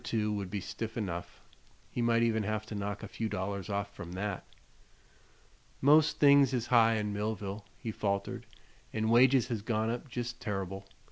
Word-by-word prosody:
2 105 Hz, -3 st, 0 dB
would 100 Hz, -3 st, -3 dB
be 100 Hz, +1 st, -2 dB
stiff 115 Hz, +4 st, -5 dB
enough; 90 Hz, -6 st, -4 dB, 0.5 s
he 120 Hz, -, -2 dB
might 115 Hz, 0 st, +3 dB
even 110 Hz, -1 st, +2 dB
have 110 Hz, +1 st, -2 dB
to -, -, -8 dB
knock 100 Hz, -1 st, -4 dB
a -, -, -5 dB
few 110 Hz, -1 st, -3 dB
dollars 100 Hz, +1 st, -3 dB
off 100 Hz, 0 st, -2 dB
from 85 Hz, +1 st, -8 dB
that. 100 Hz, 0 st, -3 dB, 1.4 s
"Most 150 Hz, +2 st, +5 dB
things 140 Hz, -2 st, +6 dB
is 120 Hz, -2 st, -1 dB
high 115 Hz, -1 st, +6 dB
in 105 Hz, -1 st, -1 dB
Millville," 105 Hz, -1 st, -3 dB
he 115 Hz, -, -4 dB
faltered, 100 Hz, -2 st, -2 dB, 0.4 s
"an' 110 Hz, 0 st, 0 dB
wages 125 Hz, +1 st, +5 dB
has 115 Hz, -4 st, -2 dB
gone 110 Hz, +1 st, 0 dB
up 120 Hz, +3 st, -5 dB
jest 120 Hz, 0 st, -4 dB
terr'ble. 95 Hz, -2 st, -4 dB
110 Hz, 175 wpm, -31 LUFS, 100-115 Hz, 1.4 s, things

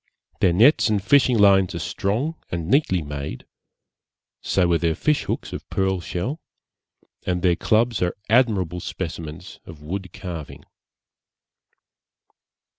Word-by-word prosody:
Their 90 Hz, -, +4 dB
nets 115 Hz, -, +5 dB
and 105 Hz, -2 st, +2 dB
fishing 125 Hz, +4 st, +3 dB
lines 95 Hz, -3 st, +4 dB
are -, -, -2 dB
strong 105 Hz, -, -2 dB, 0.2 s
and 85 Hz, -2 st, -4 dB
neatly 95 Hz, -, +2 dB
made, 70 Hz, -1 st, -6 dB, 1.0 s
so 90 Hz, -2 st, +1 dB
are 85 Hz, -, +4 dB
their 85 Hz, -2 st, 0 dB
fish 150 Hz, -, 0 dB
hooks -, -, -4 dB
of -, -, -8 dB
pearl 95 Hz, -1 st, 0 dB
shell; 95 Hz, -, -4 dB, 0.9 s
and 90 Hz, -1 st, -1 dB
their 90 Hz, -2 st, +4 dB
clubs 115 Hz, +4 st, +1 dB
are 90 Hz, -1 st, -1 dB
admirable 105 Hz, -7 st, +2 dB
specimens 85 Hz, 0 st, -7 dB
of 80 Hz, -3 st, -12 dB
wood 90 Hz, +3 st, -5 dB
carving. 85 Hz, -6 st, -8 dB
95 Hz, 125 wpm, -23 LUFS, 85-110 Hz, 1.0 s, nets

